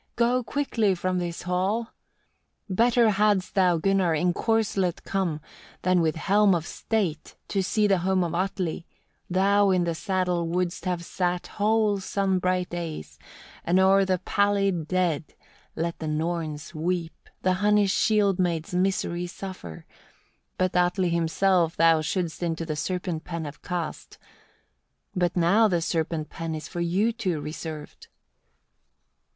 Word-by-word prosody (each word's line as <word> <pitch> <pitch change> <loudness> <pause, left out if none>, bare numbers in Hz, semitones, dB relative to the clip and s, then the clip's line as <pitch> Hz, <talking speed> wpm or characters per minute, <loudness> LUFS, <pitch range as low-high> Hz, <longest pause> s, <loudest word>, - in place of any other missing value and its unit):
Go 245 +2 +2
quickly 230 -7 0
from 185 +1 -1
this 175 -1 -4
hall! 190 +6 -1 0.8
16. 185 - -3
"Better 235 +1 +4
hadst 205 -2 +1
thou, 180 -3 +3
Gunnar! 185 -1 +2
in 175 +3 +1
corslet 200 -5 0
come, 185 -6 -1 0.4
than 185 -1 +3
with 160 -1 +1
helm 200 +3 +3
of 165 -1 -2
state, 185 -10 -2
to 195 - 0
see 210 +3 +1
the 195 -3 +3
home 185 +1 +1
of 170 -1 -3
Atli; 180 -2 -2 0.4
thou 200 +2 +3
in 185 -2 +3
the 170 -1 -1
saddle 180 -1 -1
wouldst 180 +2 -2
have 175 -2 -2
sat 180 0 -1
whole 210 -1 +1
sun 190 -1 0
bright 180 0 0
days, 165 - -6 0.4
and 180 +2 +2
o'er 195 +1 +5
the 190 -1 +1
pallid 195 -3 +1
dead 170 -5 -1 0.4
let 170 +1 -3
the 160 - -4
Norns 155 0 -3
weep, 170 +1 -3
the 185 - +3
Hunnish 205 -1 +3
shield 205 -4 +2
maids 170 -2 -1
misery 180 -1 0
suffer; 180 - -8 0.7
but 185 0 0
Atli 180 +1 +2
himself 170 +1 +1
thou 165 -1 +5
shouldst 165 0 -2
into 165 -1 -2
the 155 -2 -3
serpent 175 0 -3
pen 165 -2 -5
have 145 -1 -9
cast; 175 -3 -5 1.0
but 180 -1 0
now 195 +6 +4
the 175 -4 +1
serpent 160 -2 -2
pen 165 -1 -4
is 155 -1 -6
for 175 - -5
you 190 +7 +1
two 190 -9 -2
reserved." 150 0 -7
180 Hz, 145 wpm, -26 LUFS, 165-195 Hz, 1.0 s, o'er